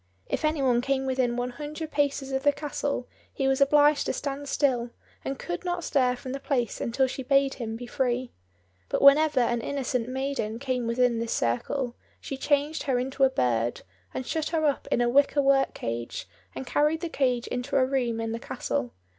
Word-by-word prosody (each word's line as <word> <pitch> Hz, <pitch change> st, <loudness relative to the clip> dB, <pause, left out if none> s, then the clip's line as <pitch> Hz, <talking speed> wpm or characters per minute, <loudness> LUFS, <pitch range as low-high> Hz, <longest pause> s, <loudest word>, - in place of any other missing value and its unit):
If -, -, -3 dB
any 310 Hz, -2 st, +1 dB
one 245 Hz, -2 st, +3 dB
came 270 Hz, +1 st, 0 dB
within 255 Hz, -2 st, 0 dB
one 245 Hz, 0 st, -2 dB
hundred 305 Hz, +4 st, -6 dB
paces 280 Hz, -2 st, 0 dB
of 265 Hz, 0 st, 0 dB
the 290 Hz, +1 st, +4 dB
castle 285 Hz, -3 st, -3 dB, 0.2 s
he 270 Hz, -, -1 dB
was 270 Hz, +1 st, +2 dB
obliged 290 Hz, +1 st, +5 dB
to -, -, 0 dB
stand 280 Hz, 0 st, -4 dB
still, 245 Hz, -4 st, +1 dB, 0.3 s
and 270 Hz, -, -3 dB
could 175 Hz, -, -5 dB
not 350 Hz, -1 st, -2 dB
stir 255 Hz, -4 st, +2 dB
from 255 Hz, +1 st, -7 dB
the 275 Hz, -, -4 dB
place 255 Hz, -5 st, -1 dB
until 250 Hz, +3 st, +1 dB
she 260 Hz, +1 st, -4 dB
bade 275 Hz, +1 st, +3 dB
him 225 Hz, -3 st, -5 dB
be 245 Hz, +2 st, -7 dB
free. 250 Hz, 0 st, -1 dB, 0.6 s
But -, -, 0 dB
whenever 285 Hz, -1 st, +6 dB
an 240 Hz, 0 st, +1 dB
innocent 250 Hz, -3 st, -2 dB
maiden 265 Hz, -4 st, -2 dB
came 250 Hz, -2 st, -2 dB
within 235 Hz, 0 st, +2 dB
this 230 Hz, 0 st, -2 dB
circle, 235 Hz, -, -1 dB, 0.2 s
she 275 Hz, -, -5 dB
changed 290 Hz, +3 st, 0 dB
her 255 Hz, -, +3 dB
into 265 Hz, +2 st, -1 dB
a -, -, +4 dB
bird, 120 Hz, -, 0 dB, 0.3 s
and 260 Hz, -, -4 dB
shut 315 Hz, +3 st, -2 dB
her 320 Hz, -2 st, 0 dB
up 285 Hz, -2 st, 0 dB
in -, -, +3 dB
a 240 Hz, -, +3 dB
wicker 280 Hz, +3 st, +3 dB
work 270 Hz, 0 st, +3 dB
cage, 115 Hz, -2 st, -4 dB, 0.3 s
and 130 Hz, 0 st, -5 dB
carried 300 Hz, +2 st, +1 dB
the 345 Hz, -, -2 dB
cage 255 Hz, -6 st, 0 dB
into 250 Hz, +3 st, -3 dB
a 260 Hz, -, +4 dB
room 250 Hz, -4 st, 0 dB
in 225 Hz, 0 st, -2 dB
the 230 Hz, -, -3 dB
castle. 120 Hz, -, -3 dB
265 Hz, 200 wpm, -27 LUFS, 240-280 Hz, 0.6 s, whenever